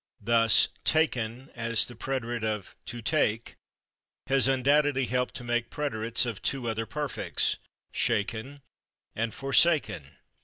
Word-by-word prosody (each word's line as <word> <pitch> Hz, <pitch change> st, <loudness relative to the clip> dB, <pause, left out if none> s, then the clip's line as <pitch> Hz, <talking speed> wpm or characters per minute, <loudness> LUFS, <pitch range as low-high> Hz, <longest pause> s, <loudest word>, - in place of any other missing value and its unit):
Thus 115 Hz, 0 st, +5 dB, 0.2 s
/taken/, 130 Hz, -5 st, 0 dB
as 115 Hz, -1 st, +1 dB
the 120 Hz, -, -9 dB
preterite 120 Hz, -2 st, -3 dB
of 105 Hz, -3 st, -3 dB
/to 120 Hz, 0 st, -6 dB
take/, 115 Hz, -7 st, +1 dB, 0.7 s
has 135 Hz, 0 st, +3 dB
undoubtedly 135 Hz, +1 st, +3 dB
helped 125 Hz, +1 st, -1 dB
to -, -, -6 dB
make 120 Hz, 0 st, -1 dB
preterites 115 Hz, -5 st, 0 dB
of 115 Hz, -4 st, -5 dB
two 130 Hz, -3 st, -1 dB
other 115 Hz, 0 st, -2 dB
perfects, 150 Hz, -3 st, -1 dB, 0.4 s
/shaken/ 115 Hz, +7 st, -1 dB, 0.5 s
and 115 Hz, 0 st, -1 dB
/forsaken 135 Hz, -, +2 dB
120 Hz, 120 wpm, -28 LUFS, 115-135 Hz, 0.7 s, Thus